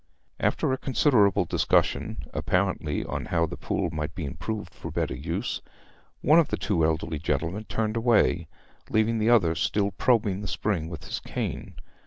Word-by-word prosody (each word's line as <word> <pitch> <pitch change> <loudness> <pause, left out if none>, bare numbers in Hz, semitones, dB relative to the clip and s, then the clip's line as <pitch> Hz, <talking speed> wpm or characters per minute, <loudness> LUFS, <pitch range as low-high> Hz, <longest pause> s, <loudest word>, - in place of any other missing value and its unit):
After 130 - +1
a 130 - -2
considerable 120 -6 +3
discussion, - - +1
apparently 90 -5 0
on - - -4
how 85 -1 +1
the 75 - -6
pool - - -2
might 75 +2 -4
be 80 - -4
improved 105 - -5
for - - -7
better - - -1
use, 85 - -3 0.6
one 155 +3 +6
of 165 - +3
the - - -2
two 90 -6 0
elderly 80 0 0
gentlemen 80 +8 -2
turned 110 0 -1
away, 115 -8 +3 0.4
leaving 110 +1 +2
the 110 +2 +2
other 100 -9 +5
still 100 +4 0
probing 105 -1 +1
the 105 - -5
spring 85 -7 -1
with 80 -4 -7
his - - -4
cane. - - -5
100 Hz, 165 wpm, -27 LUFS, 80-110 Hz, 0.6 s, one